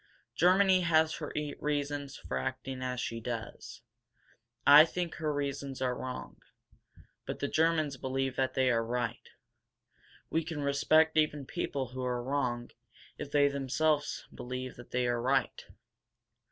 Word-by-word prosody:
Germany 185 +1 +4
has 160 -2 +3
her - - -5 0.3
reasons 145 -1 -2
for - - -4
acting 130 0 -4
as 125 -1 -3
she 115 -2 -3
does. 115 -1 -6 0.8
I 145 +2 +10
think 170 +1 -3
her 155 -2 -1
reasons 140 -2 -3
are 130 -1 0
wrong. 130 0 -7 0.9
But - - -3
the 140 - -2
Germans 155 -3 +1
believe 130 0 -2
that 130 -1 0
they 130 -1 +3
are 115 -1 +2
right. 120 0 -3 1.0
We 165 - +1
can 155 -3 -4
respect 155 +3 +3
even 150 -2 +2
people 135 -5 -3
who 130 +1 -5
are 125 -1 -1
wrong 125 -3 -2 0.5
if - - -5
they 145 -1 +5
themselves 145 +2 0
believe 130 +1 -6
that 120 - -12
they 125 0 0
are 120 -1 0
right. 130 +3 0
135 Hz, 140 wpm, -31 LUFS, 125-150 Hz, 1.0 s, I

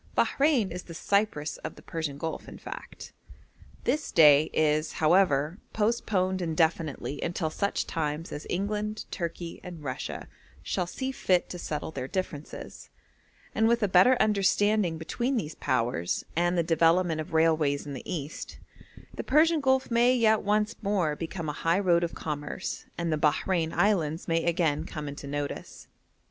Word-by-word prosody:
Bahrein 275 - +2
is 180 +1 -5
the 170 - -11
Cyprus 170 -6 0
of - - -7
the - - -15
Persian 160 -4 -4
Gulf, 160 +2 -5
in - - -9
fact. - - -9 0.7
This 290 +5 -1
day 150 -1 +7
is, 155 0 +1
however, 160 0 +3
postponed 205 -4 0
indefinitely 160 -3 -1
until 170 -2 -2
such 200 +5 -1
times 155 +1 -3
as 150 - -6
England, 210 +3 -2
Turkey, 170 -1 -5
and 175 -4 -9
Russia 130 -2 -5 0.4
shall 180 - -1
see 260 +8 -3
fit 185 -9 +1
to 180 - -6
settle 150 -1 -4
their 130 -4 -5
differences; 155 -4 -6 0.6
and 220 0 +3
with 235 -1 +2
a - - +4
better 190 +8 +6
understanding 205 -3 +2
between 240 +11 -1
these 155 -8 -3
Powers, 115 -9 -1
and 175 +2 +2
the 170 - +3
development 165 0 +3
of 155 - -9
railways 155 -3 +2
in 145 - -6
the 130 - -7
East, 155 -4 -5 0.6
the - - -5
Persian 310 +3 +4
Gulf 265 -2 +2
may 240 +2 +4
yet 220 -3 +4
once 210 +1 +1
more 195 -7 +1
become 165 +1 -5
a 150 - -2
high 165 +4 +1
road 175 -3 +3
of 170 - -3
commerce, 150 +3 -4
and 170 -2 -1
the 155 - -1
Bahrein 160 +2 +1
Islands 170 -7 +1
may 165 -1 +1
again 165 -3 +1
come 150 -2 -6
into 140 0 -7
notice. 145 0 -5
170 Hz, 155 wpm, -28 LUFS, 155-205 Hz, 0.7 s, day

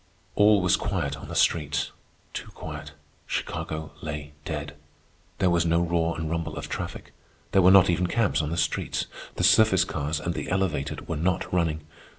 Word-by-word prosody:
All 105 -1 +5
was 90 -1 +3
quiet 70 0 -2
on 70 - -10
the - - -6
streets—too 75 -3 -1
quiet. - - -7 0.3
Chicago 80 0 -3
lay 75 -1 -5
dead. 75 -2 -4 0.6
There 90 - +2
was 85 0 +3
no 85 0 +2
roar 85 -1 0
and 80 0 -3
rumble 80 -1 -3
of - - -5
traffic. - - -6 0.4
There 95 - +5
were 90 - +7
not 95 0 +8
even 90 +1 +1
cabs 105 -3 +1
on 75 - -2
the 85 - -3
streets. - - 0 0.3
The - - -2
surface 110 -5 +6
cars 75 0 -2
and 85 +2 -2
the - - -4
elevated 90 -7 -1
were - - -2
not 90 +4 -1
running. 80 -3 0
85 Hz, 170 wpm, -26 LUFS, 75-90 Hz, 0.6 s, not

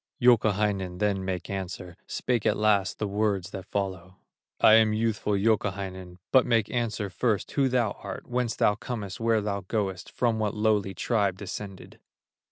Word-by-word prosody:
Youkahainen 105 -6 +2
then 100 -1 0
make 90 -2 -3
answer, 90 -2 -5
Spake 120 -4 -1
at - - +2
last 105 -2 +2
the 105 - -2
words 100 -2 -1
that 95 -1 -7
follow: 95 -2 -4 0.4
"I 110 - +7
am 110 -1 +6
youthful 110 -1 0
Youkahainen, 95 -3 -1
But 130 -2 +6
make 115 -3 +2
answer 110 -4 -2
first, 110 +2 0
who 135 -2 +2
thou 120 -4 +1
art, - - -7
Whence 125 -1 -1
thou 105 - +3
comest, 105 -3 -6
where 115 -1 +2
thou 100 -1 -2
goest, 95 -4 -2
From 115 -3 0
what 105 -1 -1
lowly 105 -3 +1
tribe 100 -2 0
descended?" 100 0 -8
105 Hz, 160 wpm, -27 LUFS, 95-110 Hz, 0.4 s, I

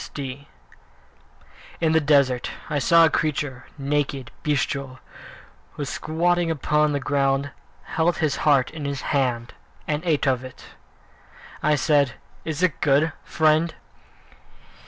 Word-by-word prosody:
III 140 0 -6 1.3
In 160 -2 +2
the 160 0 +4
desert 140 -4 +3 0.2
I 145 - +1
saw 165 +4 +6
a - - +3
creature, 145 -5 -2
naked, 140 -2 -2
bestial, 140 -2 -1 0.8
who, 145 - -4
squatting 170 +4 0
upon 150 0 +1
the 145 - 0
ground, 140 0 0 0.3
Held 165 +2 0
his 155 -4 0
heart 140 -4 +3
in 155 -2 -6
his 140 -2 -3
hands, 125 -4 -1 0.4
And 150 +1 -1
ate 160 -5 +1
of 130 -2 +1
it. 130 - -11 1.0
I 150 0 +3
said, 145 -4 +2 0.3
"Is 160 +2 -3
it 180 -5 +1
good, 150 +3 +3
friend?" 160 +1 +2
145 Hz, 125 wpm, -23 LUFS, 135-155 Hz, 1.3 s, saw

